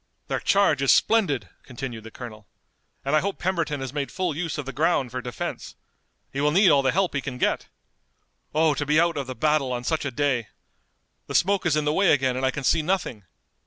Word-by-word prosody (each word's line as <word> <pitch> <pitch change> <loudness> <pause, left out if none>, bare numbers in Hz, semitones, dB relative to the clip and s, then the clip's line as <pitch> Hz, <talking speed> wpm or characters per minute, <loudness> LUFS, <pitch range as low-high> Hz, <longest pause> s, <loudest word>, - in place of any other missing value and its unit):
"Their - - 0
charge - - +3
is - - +4
splendid," 145 - +2
continued 125 -3 -7
the - - -8
colonel, 110 -3 -10 0.6
"and 140 +3 +1
I - - +5
hope 200 +4 -3
Pemberton 165 -6 -1
has 135 -1 -5
made 145 -2 -3
full 180 -4 -2
use 165 -1 -3
of 150 - -4
the 135 - -6
ground 145 -3 +1
for 125 0 -4
defense! 125 0 -6 0.6
He 140 - -2
will 150 - +3
need 185 +3 +5
all 140 - +5
the 135 -1 +2
help 190 0 +1
he 140 - -1
can 130 -2 -6
get! - - 0 0.8
Oh, 155 0 +3
to 145 - -2
be 150 +2 +3
out 170 -1 +2
of 140 -3 -3
the 130 - -5
battle 150 -3 +1
on 120 -1 -3
such 160 +5 -1
a 140 - -1
day! 130 -4 0 0.8
The - - -5
smoke 195 -1 +2
is 155 - +2
in 150 -1 0
the 150 - +1
way 195 +2 +4
again 130 -3 +1
and 130 - -3
I 130 - +3
can 140 +1 -4
see 160 +5 +3
nothing. 155 - -2
145 Hz, 230 wpm, -25 LUFS, 130-165 Hz, 0.8 s, I